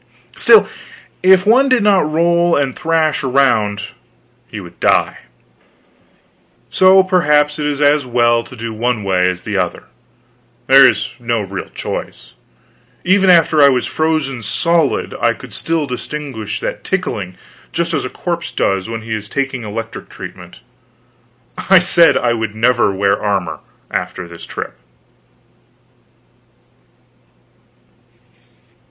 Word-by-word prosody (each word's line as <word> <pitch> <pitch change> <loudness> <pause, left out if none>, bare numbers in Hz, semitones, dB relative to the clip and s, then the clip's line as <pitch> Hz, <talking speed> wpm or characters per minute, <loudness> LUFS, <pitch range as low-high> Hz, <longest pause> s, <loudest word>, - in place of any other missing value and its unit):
Still, 435 - +5 0.5
if 185 +1 +5
one 260 +6 +4
did 255 -4 +2
not 195 -7 +2
roll 170 +1 +2
and 140 -2 -1
thrash 160 -3 0
around 125 -7 +1 0.6
he - - -8
would - - -13
die; - - +1 1.5
so 190 0 +5
perhaps 150 -5 +2
it 150 - -1
is 145 -1 -3
as 145 0 +3
well 120 -1 +1
to - - -12
do 115 -1 -6
one 115 0 -2
way 90 -2 +1
as 90 0 -6
the - - -3
other; - - -2 0.8
there 135 +2 +7
is 125 0 -3
no 120 -2 -1
real 95 -1 -7
choice. - - -7 0.7
Even 190 +1 +3
after 165 -3 +4
I 140 - +7
was 125 -2 0
frozen 155 -5 -2
solid 165 - 0
I - - +2
could - - -13
still 165 -2 -2
distinguish 125 -5 -6
that - - -5
tickling, 105 - -3 0.3
just 170 +1 -2
as - - -1
a 130 - -4
corpse 170 +3 -4
does 95 +1 -1
when 115 -1 -5
he 115 0 -5
is 105 -1 -5
taking 135 -2 -3
electric 110 +1 -7
treatment. - - -11 1.1
I 190 - +8
said 170 -1 +4
I 120 -1 +1
would 110 -2 -4
never 120 -1 +2
wear 100 +1 0
armor 100 -5 -2 0.3
after 90 -2 -4
this 85 -1 -12
trip. - - -7
135 Hz, 130 wpm, -16 LUFS, 110-165 Hz, 1.5 s, I